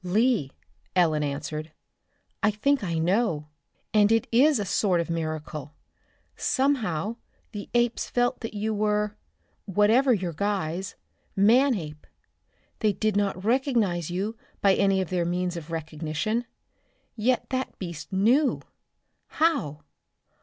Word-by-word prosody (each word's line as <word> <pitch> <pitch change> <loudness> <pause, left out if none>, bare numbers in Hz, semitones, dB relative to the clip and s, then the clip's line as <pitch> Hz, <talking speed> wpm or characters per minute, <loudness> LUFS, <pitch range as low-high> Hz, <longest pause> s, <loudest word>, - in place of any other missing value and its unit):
"Lee," 200 - +2 0.4
Ellen 160 -4 +3
answered, 150 +2 -4 0.7
"I 210 - +4
think 265 +5 +1
I 170 -4 -1
know, 165 -3 +1 0.4
and 210 0 +5
it 225 -1 +3
is 275 +5 +5
a 205 - -2
sort 185 -1 +1
of 170 0 -2
miracle. 155 -2 -4 0.6
Somehow 230 - 0 0.3
the 205 -2 -7
apes 240 -1 +1
felt 245 +1 +1
that 225 -2 -6
you 215 +1 -1
were 210 0 0 0.5
whatever 215 +7 +4
your 185 -7 0
guise 190 -1 -2 0.4
Manape. 200 - +2 0.7
They 215 -2 +2
did 215 0 0
not 200 -2 0
recognize 225 - +1
you 195 +6 -2 0.2
by 195 -1 +4
any 195 -1 +2
of 185 - -5
their 180 -2 +1
means 180 +1 -1
of 170 -1 -7
recognition; 165 +8 -3 0.7
yet 245 +3 0
that 260 0 -2
beast 170 -2 -7
knew! 240 +10 +2 0.6
How? 280 - 0
200 Hz, 125 wpm, -26 LUFS, 170-230 Hz, 0.7 s, and